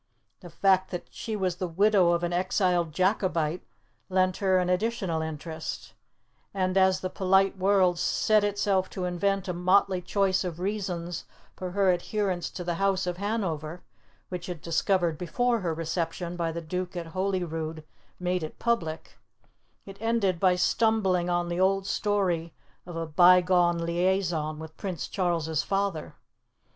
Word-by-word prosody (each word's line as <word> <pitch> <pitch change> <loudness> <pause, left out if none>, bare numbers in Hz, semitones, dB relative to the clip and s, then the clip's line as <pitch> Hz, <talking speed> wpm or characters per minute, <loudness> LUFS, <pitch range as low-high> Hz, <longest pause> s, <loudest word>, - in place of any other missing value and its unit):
The 175 - -11
fact 190 +2 +2
that 180 - -5
she 220 - -5
was 185 -4 -1
the 185 - -2
widow 185 0 +3
of 170 0 0
an 175 0 -1
exiled 180 -2 +1
Jacobite 180 -2 0 0.5
lent 185 -1 +2
her 190 -2 +2
an 180 -1 +1
additional 180 -3 0
interest; 160 0 -6 0.6
and 185 -1 0
as 190 -1 +4
the 185 - -2
polite 190 +1 +2
world 190 -2 +3
set 215 +3 +2
itself 200 -2 +1
to 185 - -4
invent 195 +2 0
a 180 - -1
motley 185 +1 +2
choice 195 +1 +1
of 175 -2 -5
reasons 180 -3 -3 0.3
for 185 - -5
her 195 -1 +3
adherence 185 0 -1
to 180 - -7
the 175 0 -1
House 195 -1 +2
of 180 -1 -3
Hanover 180 -6 -3 0.5
which 180 -1 -5
it 170 -3 -6
discovered 170 -1 +1
before 235 +7 0
her 175 -4 -2
reception 165 +2 -3
by 170 -2 -1
the 170 +1 -5
Duke 180 +2 -4
at 170 - -4
Holyrood 165 -5 -2 0.4
made 180 0 -1
it 155 - -6
public 165 -10 -2 0.7
it 195 0 -10
ended 225 -6 +1
by 185 -1 +4
stumbling 190 -2 +2
on 175 0 0
the 175 +1 -2
old 195 +1 +2
story 185 -6 0 0.3
of 175 - -7
a 165 0 -2
bygone 175 +1 +5
liaison 170 -2 0
with 160 0 -9
Prince 185 -6 -4
Charles's 165 -5 0
father. 195 -4 -2
180 Hz, 155 wpm, -27 LUFS, 170-195 Hz, 0.7 s, bygone